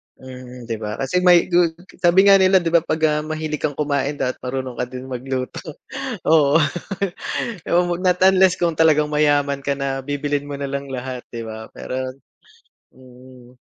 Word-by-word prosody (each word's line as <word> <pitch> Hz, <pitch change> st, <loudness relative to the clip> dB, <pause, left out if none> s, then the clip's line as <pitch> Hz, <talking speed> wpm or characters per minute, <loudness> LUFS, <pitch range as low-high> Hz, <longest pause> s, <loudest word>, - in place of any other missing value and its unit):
Mm, 125 Hz, -1 st, -11 dB
'di 115 Hz, -2 st, -5 dB
ba? 105 Hz, 0 st, -4 dB
Kasi 135 Hz, +7 st, 0 dB
may 180 Hz, -2 st, +6 dB
dud 175 Hz, -2 st, +2 dB, 0.2 s
sabi 180 Hz, +2 st, +5 dB
nga 195 Hz, -1 st, +7 dB
nila 190 Hz, 0 st, +5 dB
'di 170 Hz, -2 st, -1 dB
ba 170 Hz, -, +6 dB
'pag, 160 Hz, -1 st, -3 dB
ah, 150 Hz, -1 st, +1 dB
mahilig 155 Hz, -1 st, -4 dB
kang 145 Hz, -3 st, -2 dB
kumain 145 Hz, -1 st, -1 dB
dapat 130 Hz, -2 st, -2 dB
marunong 130 Hz, 0 st, -4 dB
ka 125 Hz, -, 0 dB
din 130 Hz, 0 st, -8 dB
magluto. 130 Hz, 0 st, -4 dB, 0.6 s
Oo. 150 Hz, -2 st, +5 dB, 1.1 s
Yo 175 Hz, +1 st, +3 dB, 0.2 s
not 180 Hz, -1 st, +2 dB
unless 190 Hz, -1 st, +5 dB
kung 170 Hz, -2 st, +1 dB
talagang 150 Hz, -2 st, +3 dB
mayaman 145 Hz, -2 st, +2 dB
ka 140 Hz, +1 st, -1 dB
na, 135 Hz, -1 st, -2 dB
bibilin 145 Hz, +1 st, -2 dB
mo 145 Hz, -, -4 dB
na 140 Hz, -1 st, -4 dB
lang 140 Hz, 0 st, -4 dB
lahat, 130 Hz, -1 st, -5 dB
'di 115 Hz, -1 st, -6 dB
ba, 110 Hz, 0 st, -8 dB
peron 130 Hz, 0 st, -5 dB, 0.8 s
mm. 125 Hz, -1 st, -17 dB
140 Hz, 170 wpm, -21 LUFS, 130-160 Hz, 1.1 s, nga